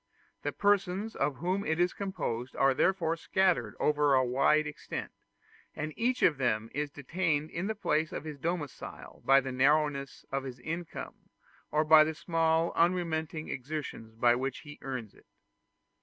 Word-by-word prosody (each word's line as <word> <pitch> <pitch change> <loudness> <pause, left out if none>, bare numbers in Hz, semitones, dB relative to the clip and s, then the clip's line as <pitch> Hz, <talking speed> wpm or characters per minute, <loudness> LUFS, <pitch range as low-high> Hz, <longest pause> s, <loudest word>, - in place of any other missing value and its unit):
The - - -2
persons 205 +1 +1
of 145 - 0
whom 185 +7 -1
it 160 -1 -1
is 175 0 +2
composed 130 - -4
are 135 0 +4
therefore 165 +1 +2
scattered 165 - +1
over 150 -2 +3
a 130 0 +4
wide 135 +5 +3
extent, 150 -1 -6 0.6
and 155 +1 -4
each 250 +2 0
of 150 -6 +4
them 115 -3 0
is 145 0 -2
detained 155 +1 -1
in 175 +4 -3
the 220 - -2
place 155 -6 0
of - - -5
his 155 -2 -7
domicile 160 -3 -5
by 135 +1 +6
the 130 0 -5
narrowness 140 +1 +1
of 135 0 0
his 130 -2 -7
income, 165 +4 -6 0.4
or 155 +1 +2
by 155 0 +8
the 160 0 -2
small 165 0 +1
unremitting 165 -3 0
exertions 130 -5 -5
by 120 +1 +4
which 130 +2 -2
he 145 -1 -11
earns 125 -6 -5
it. - - -22
155 Hz, 160 wpm, -30 LUFS, 135-170 Hz, 0.6 s, by